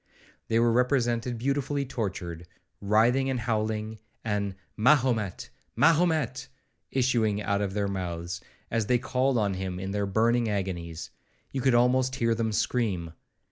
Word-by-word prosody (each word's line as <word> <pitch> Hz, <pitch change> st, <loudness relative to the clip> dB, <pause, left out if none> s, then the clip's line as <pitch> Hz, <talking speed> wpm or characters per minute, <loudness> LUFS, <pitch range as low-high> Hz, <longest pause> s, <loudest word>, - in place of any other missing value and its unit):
They 115 Hz, -, +1 dB
were 115 Hz, 0 st, +4 dB
represented 120 Hz, -1 st, +1 dB
beautifully 140 Hz, +3 st, -1 dB
tortured, 90 Hz, -8 st, -4 dB, 0.3 s
writhing 115 Hz, +6 st, +3 dB
and 130 Hz, -2 st, -1 dB
howling, 110 Hz, -1 st, -2 dB, 0.2 s
and 100 Hz, -3 st, -1 dB, 0.2 s
'Mahomet! 120 Hz, -5 st, +2 dB, 0.2 s
Mahomet!' 160 Hz, -7 st, +2 dB, 0.4 s
issuing 120 Hz, -5 st, +1 dB
out 100 Hz, -1 st, 0 dB
of 100 Hz, -1 st, -2 dB
their 100 Hz, -1 st, 0 dB
mouths, 90 Hz, -1 st, -4 dB, 0.3 s
as 115 Hz, -2 st, 0 dB
they 125 Hz, -, +4 dB
called 130 Hz, +1 st, 0 dB
on 100 Hz, -3 st, +1 dB
him 95 Hz, -1 st, -4 dB
in 95 Hz, +1 st, -4 dB
their 100 Hz, 0 st, -1 dB
burning 115 Hz, +3 st, +2 dB
agonies;—you 95 Hz, +5 st, -5 dB
could 130 Hz, -1 st, +3 dB
almost 130 Hz, +2 st, +3 dB
hear 115 Hz, -3 st, +1 dB
them 115 Hz, -1 st, -1 dB
scream. 100 Hz, -7 st, -1 dB
115 Hz, 135 wpm, -27 LUFS, 100-125 Hz, 0.4 s, were